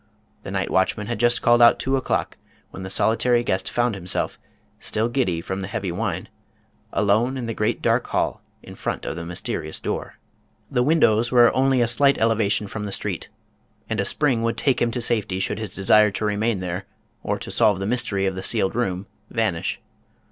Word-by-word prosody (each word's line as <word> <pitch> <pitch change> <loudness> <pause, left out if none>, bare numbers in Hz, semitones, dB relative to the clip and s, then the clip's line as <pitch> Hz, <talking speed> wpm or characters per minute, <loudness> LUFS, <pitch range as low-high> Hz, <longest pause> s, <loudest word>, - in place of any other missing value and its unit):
The - - -8
night 95 -1 -2
watchman 95 +3 +1
had 120 +2 -4
just 120 0 +2
called 120 0 +5
out 120 0 +7
two 135 +1 0
o'clock 130 - -1 0.4
when - - -8
the 95 - -6
soli 110 +4 +2
tary 120 -1 +2
guest 95 -5 -1
found 120 -1 +1
himself, 95 -2 -3 0.4
still 110 +2 -1
giddy 120 -10 0
from 95 +3 -4
the 95 - -4
heavy 100 -4 -3
wine, 90 -1 -3 0.6
alone 110 +6 +2
in 125 - -4
the 115 - -3
great 105 0 -1
dark - - +2
hall - - -1 0.2
in - - -11
front - - -4
of - - -3
the 85 - -5
mysterious 85 -2 -4
door. - - -4 0.5
The 125 - +2
windows 120 -5 +3
were 120 -2 +7
at - - -5
only 130 -1 +3
a 120 - +3
slight 140 +4 +3
elevation 110 -2 +2
from 105 +1 -5
the - - -5
street, - - -3 0.6
and - - -2
a - - +2
spring 135 -6 +1
would 115 0 -1
take 135 -3 +1
him 120 - +3
to 120 +1 -3
safety 110 -5 0
should 95 +2 -1
his 105 -2 -5
desire 105 +2 +5
to 100 +2 -3
remain 105 -1 0
there, 90 +1 -4 0.3
or - - -2
to - - -7
solve 105 -3 +3
the 95 - -3
mystery 100 -4 -1
of 95 - 0
the 95 - -5
sealed 95 0 +1
room, 95 -5 -2 0.2
vanish. 110 -8 -1
110 Hz, 205 wpm, -23 LUFS, 95-120 Hz, 0.6 s, out